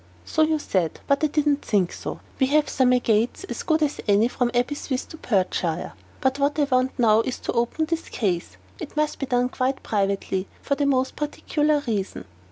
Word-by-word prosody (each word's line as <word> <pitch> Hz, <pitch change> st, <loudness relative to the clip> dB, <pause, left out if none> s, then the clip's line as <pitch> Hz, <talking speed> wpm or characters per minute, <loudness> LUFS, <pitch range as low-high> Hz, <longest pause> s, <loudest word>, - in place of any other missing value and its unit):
"So -, -, 0 dB
you 315 Hz, 0 st, +3 dB
said; 185 Hz, -, -1 dB
but 280 Hz, +2 st, +1 dB
I -, -, +5 dB
did 300 Hz, 0 st, 0 dB
not 290 Hz, -1 st, +2 dB
think 195 Hz, -5 st, +1 dB
so. -, -, -6 dB, 0.2 s
We 265 Hz, -, +4 dB
have 300 Hz, +2 st, +3 dB
some 255 Hz, -2 st, +3 dB
agates 235 Hz, -, +2 dB
as 390 Hz, -, -5 dB
good 315 Hz, -1 st, +2 dB
as 295 Hz, -1 st, -1 dB
any 205 Hz, +2 st, +4 dB
from 245 Hz, -1 st, 0 dB
Aberystwith 255 Hz, +3 st, -2 dB
or -, -, -8 dB
Perthshire. 185 Hz, -, -1 dB, 0.3 s
But 265 Hz, +1 st, +1 dB
what 285 Hz, +2 st, +1 dB
I 300 Hz, -, +3 dB
want 260 Hz, -2 st, +1 dB
now 225 Hz, -3 st, +5 dB
is 255 Hz, +2 st, -3 dB
to -, -, -2 dB
open 240 Hz, +7 st, 0 dB
this 330 Hz, +1 st, -3 dB
case. 175 Hz, -, -2 dB, 0.2 s
It -, -, -8 dB
must 305 Hz, 0 st, 0 dB
be 275 Hz, -, -2 dB
done 245 Hz, -1 st, +1 dB
quite 260 Hz, +1 st, -1 dB
privately, 195 Hz, -2 st, -1 dB, 0.2 s
for -, -, 0 dB
a 285 Hz, -, +2 dB
most 260 Hz, -1 st, +1 dB
particular 295 Hz, 0 st, 0 dB
reason. 200 Hz, -, -3 dB
255 Hz, 200 wpm, -24 LUFS, 215-295 Hz, 0.3 s, I